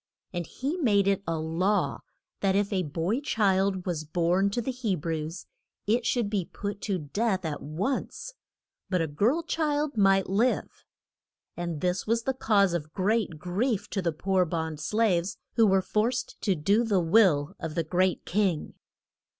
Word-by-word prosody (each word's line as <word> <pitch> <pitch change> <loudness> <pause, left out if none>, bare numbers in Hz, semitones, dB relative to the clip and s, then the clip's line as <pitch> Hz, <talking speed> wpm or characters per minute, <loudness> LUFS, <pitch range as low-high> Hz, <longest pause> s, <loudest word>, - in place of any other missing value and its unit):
And 175 -2 -3
he 285 +7 -3
made 205 - +3
it 195 -1 +2
a 165 0 0
law 170 +6 0 0.4
that 195 -1 +1
if 200 +1 +1
a 190 - +1
boy 170 - -1
child 195 -7 +1
was 170 -4 -2
born 175 +5 +1
to 205 - -2
the 240 +3 -2
He 240 -6 -1
brews 160 +1 -4 0.4
it 230 +3 +1
should 240 -4 +1
be 200 -2 -1
put 205 +2 -6
to 195 - +1
death 190 +5 -1
at 150 -2 -3
once; 205 - -3 0.6
but 180 -3 +1
a - - +1
girl 215 - +1
child 300 -4 -1
might 195 -1 +4
live. 220 +7 0 0.7
And 170 -3 -4
this 180 +3 -1
was 230 +1 +1
the 265 - 0
cause 205 -7 +2
of 155 -2 -4
great 200 -3 0
grief 195 - -1
to 195 - -1
the 170 -2 0
poor 185 +4 +1
bond 160 -2 -3
slaves, 190 0 +1 0.2
who 225 -2 +4
were 190 -1 +3
forced 240 +5 -1
to 195 -3 +1
do 200 +9 +2
the 210 -5 +2
will 165 -5 +3
of 160 -1 -5
the 165 - +1
great 180 +3 0
king. 190 -5 0
195 Hz, 170 wpm, -27 LUFS, 170-220 Hz, 0.7 s, might